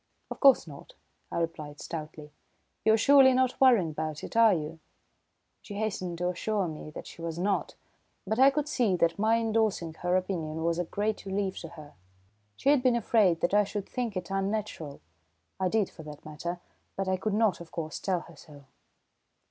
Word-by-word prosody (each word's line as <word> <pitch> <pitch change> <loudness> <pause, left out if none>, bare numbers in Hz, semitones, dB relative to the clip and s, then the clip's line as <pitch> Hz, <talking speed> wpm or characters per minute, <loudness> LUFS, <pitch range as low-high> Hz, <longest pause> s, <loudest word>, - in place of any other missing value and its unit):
"Of - - -6
course 275 -2 +6
not," - - -12 0.4
I - - -3
replied 155 -3 -4
stoutly. 155 -2 -7 0.5
"You're 220 0 +5
surely 270 +2 +6
not 255 0 +1
worrying 230 -11 +5
about 155 0 -4
it, - - -8
are 230 -1 +7
you?" 160 -2 -3 0.8
She 205 - -9
hastened 195 -5 -3
to 180 +1 0
assure 195 +2 -1
me 155 -1 -7
that 155 - -9
she - - -11
was 165 -1 -4
not, 195 +3 -1 0.5
but 220 +4 -1
I 270 +1 +8
could 295 +1 -1
see 240 -10 +1
that 170 +1 +1
my 220 +2 +3
indorsing 220 -7 0
her 180 0 +1
opinion 160 -4 -3
was 170 +1 0
a 175 - 0
great 210 +5 -2
relief 195 0 -2
to 165 - -7
her. 155 -3 -12 0.6
She 275 - 0
had 290 -3 +5
been 250 -1 +3
afraid 210 -7 +3
that 175 - +1
I 210 0 +5
should 200 0 -5
think 235 -6 -3
it 180 0 -5
unnatural. 195 -6 -3 0.6
I 185 -1 +1
did 210 -1 +1
for - - -13
that 150 -1 -11
matter, 170 +3 -5 0.4
but 195 0 -2
I 190 - +2
could 200 +2 -2
not, 215 -5 +2
of 170 - -11
course, 155 -3 -5
tell 185 -3 -1
her 170 - -14
so. 145 -1 -15
185 Hz, 190 wpm, -29 LUFS, 165-220 Hz, 0.8 s, I